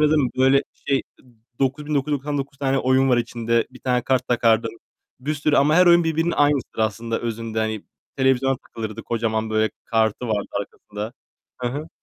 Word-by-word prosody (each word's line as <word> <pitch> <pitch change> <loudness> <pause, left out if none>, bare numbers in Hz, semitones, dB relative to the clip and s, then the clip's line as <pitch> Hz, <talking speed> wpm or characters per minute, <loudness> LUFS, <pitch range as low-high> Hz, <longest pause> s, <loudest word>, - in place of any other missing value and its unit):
aradım, 150 -4 +3
böyle, 135 +2 +4
şey, 135 -1 -1 0.6
9.999 140 0 -1
tane 135 -1 +1
oyun 130 +1 +3
var 125 - +4
içinde. 115 -1 0
Bir 130 - -15
tane 125 -1 +1
kart 130 0 0
takardın. 115 -1 +2 0.4
Bir 150 +4 -2
sürü 150 +1 +1
ama 150 +2 +4
her 180 +2 +6
oyun 170 0 +6
birbirinin 165 +1 +1
aynısıdır 145 -6 +1
aslında 115 +1 -1
özünde, 115 -1 -3
hani. 110 -2 -2 0.3
Televizyona 130 0 +2
takılırdı. 110 -3 -7
Kocaman, 110 -1 -1
böyle, 110 0 +2
kartı 110 +1 0
vardı 105 -2 0
arkasında. 105 +2 -7 0.5
Hı 125 - -1
hı. 145 +6 -5
130 Hz, 155 wpm, -23 LUFS, 115-140 Hz, 0.6 s, her